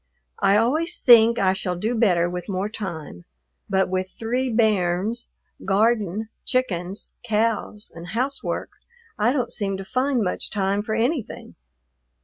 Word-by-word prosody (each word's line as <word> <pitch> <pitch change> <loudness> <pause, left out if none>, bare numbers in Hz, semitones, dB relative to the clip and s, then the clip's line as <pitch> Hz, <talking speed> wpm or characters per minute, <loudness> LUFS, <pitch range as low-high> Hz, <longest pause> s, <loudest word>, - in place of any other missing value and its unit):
I 200 +1 +4
always 310 +10 +1
think 235 -1 +6
I 190 -3 +3
shall 190 -2 -3
do 215 +7 -1
better 185 -7 +3
with 180 +3 -5
more 195 +2 -1
time, 160 - -7 0.4
but 190 -1 +2
with 185 0 -2
three 245 +5 -2
"bairns," 215 0 +1 0.3
garden, 210 0 +1
chickens, 195 -7 -2
cows, 220 -2 -1
and 165 +1 -9
housework 255 +8 -2 0.5
I 220 +4 +3
don't 260 -3 -1
seem 195 -3 -2
to 195 - -7
find 255 +3 0
much 180 - -3
time 200 0 0
for 215 +1 -3
anything. 245 +2 -2
210 Hz, 135 wpm, -23 LUFS, 190-235 Hz, 0.5 s, think